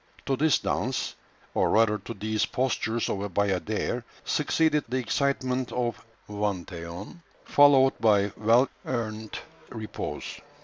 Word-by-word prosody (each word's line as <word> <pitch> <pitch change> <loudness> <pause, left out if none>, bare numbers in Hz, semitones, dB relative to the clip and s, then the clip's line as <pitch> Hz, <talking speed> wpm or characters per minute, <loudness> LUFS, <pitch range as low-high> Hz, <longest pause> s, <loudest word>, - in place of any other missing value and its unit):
To 135 - +1
this 155 +2 +3
dance, 130 0 -1 0.4
or - - +2
rather 110 -1 +3
to 115 - -8
these 110 +2 -1
postures 120 -3 0
of 100 - -2
a 100 - -3
bayadère, 100 +5 -1 0.2
succeeded 150 0 +2
the 130 - 0
excitement 130 0 0
of 120 -2 -2 0.2
vingt 100 -4 -2
et 85 -1 -6
un, 95 - -9 0.2
followed 135 -2 +6
by 105 -3 +3
well 115 +5 +4 0.2
earned 110 -3 -4 0.3
repose. 110 -1 -6
115 Hz, 130 wpm, -27 LUFS, 105-130 Hz, 0.4 s, followed